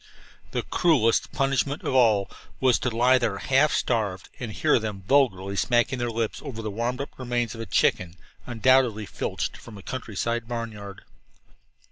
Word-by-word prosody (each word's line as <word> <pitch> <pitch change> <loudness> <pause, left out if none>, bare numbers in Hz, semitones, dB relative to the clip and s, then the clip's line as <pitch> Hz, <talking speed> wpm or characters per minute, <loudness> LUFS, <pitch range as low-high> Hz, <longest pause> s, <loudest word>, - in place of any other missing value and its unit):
The - - -2
cruelest 130 -10 +2
punishment 135 +1 0
of - - -2
all 110 -6 +4 0.3
was 130 -2 +3
to 125 - -1
lie 125 +3 +3
there 110 -5 -1
half 135 +6 +3
starved 105 -6 -1
and 120 -4 -5
hear 105 - +2
them 105 -3 -5
vulgarly 100 -6 +2
smacking 120 +4 +1
their 120 0 -1
lips 115 -1 -3
over 115 -3 -7
the 110 - -3
warmed 120 +5 -2
up 140 - -8
remains 120 -2 -1
of 115 - -7
a 115 - -6
chicken 85 -1 +1 0.3
undoubtedly 120 -2 +3
filched - - -4
from 110 -3 -12
a 100 - -12
countryside 115 -1 -3
barnyard. 110 -4 -6
115 Hz, 160 wpm, -25 LUFS, 105-130 Hz, 0.3 s, all